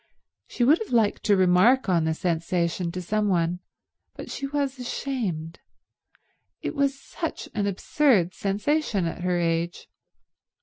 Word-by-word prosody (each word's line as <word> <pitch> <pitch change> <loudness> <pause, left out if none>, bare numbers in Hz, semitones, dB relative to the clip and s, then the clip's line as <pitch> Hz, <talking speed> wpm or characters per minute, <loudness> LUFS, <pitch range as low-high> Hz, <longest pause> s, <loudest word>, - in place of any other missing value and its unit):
She 245 - -2
would 295 +7 +5
have 445 - -5
liked 225 -4 +2
to 205 -2 +4
remark 190 +8 +4
on 170 -4 +2
the 160 0 0
sensation 170 +1 -1
to 180 +1 -5
some 210 +3 0
one, 175 -2 +1 0.6
but - - -8
she 275 - -4
was 275 -2 -2
ashamed. 210 - -3 1.0
It - - -2
was 275 -1 0
such - - -5
an 205 -1 0
absurd 200 - +2
sensation 205 - 0
at 165 - -4
her 180 0 0
age. 170 0 -1
195 Hz, 140 wpm, -25 LUFS, 175-260 Hz, 1.0 s, would